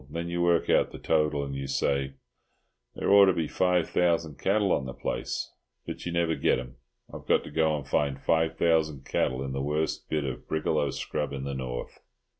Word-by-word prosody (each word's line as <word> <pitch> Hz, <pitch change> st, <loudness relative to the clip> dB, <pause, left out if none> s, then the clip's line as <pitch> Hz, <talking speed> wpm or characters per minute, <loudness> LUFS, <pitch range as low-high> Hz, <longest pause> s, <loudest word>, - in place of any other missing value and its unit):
Then 85 Hz, +3 st, -4 dB
you 85 Hz, 0 st, -1 dB
work 85 Hz, -1 st, +3 dB
out -, -, +3 dB
the -, -, -8 dB
total, 75 Hz, -2 st, +1 dB
and 70 Hz, -1 st, -5 dB
you 70 Hz, 0 st, -4 dB
say, 70 Hz, 0 st, 0 dB, 0.8 s
'There -, -, 0 dB
ought 100 Hz, 0 st, +9 dB
to 95 Hz, -, +4 dB
be 80 Hz, -3 st, -1 dB
five 90 Hz, -1 st, +1 dB
thousand 85 Hz, -4 st, +1 dB
cattle 100 Hz, 0 st, +2 dB
on 65 Hz, -, +1 dB
the 65 Hz, -, -7 dB
place,' -, -, -3 dB, 0.3 s
but -, -, -6 dB
you -, -, -2 dB
never 85 Hz, -1 st, +1 dB
get -, -, +2 dB
'em. 65 Hz, 0 st, -8 dB, 0.4 s
I've -, -, -9 dB
got -, -, +3 dB
to -, -, -10 dB
go 80 Hz, 0 st, +2 dB
and 70 Hz, -2 st, -8 dB
find 70 Hz, -1 st, 0 dB
five 80 Hz, +2 st, +1 dB
thousand 80 Hz, -4 st, +1 dB
cattle 65 Hz, +1 st, 0 dB
in 65 Hz, -, -4 dB
the 70 Hz, 0 st, -2 dB
worst 75 Hz, +3 st, -2 dB
bit 75 Hz, -1 st, 0 dB
of 65 Hz, -3 st, -5 dB
brigalow 75 Hz, -2 st, 0 dB
scrub 75 Hz, +1 st, -3 dB
in 70 Hz, -1 st, -4 dB
the 70 Hz, 0 st, -3 dB
north." 65 Hz, -2 st, -5 dB
75 Hz, 210 wpm, -28 LUFS, 70-85 Hz, 0.8 s, ought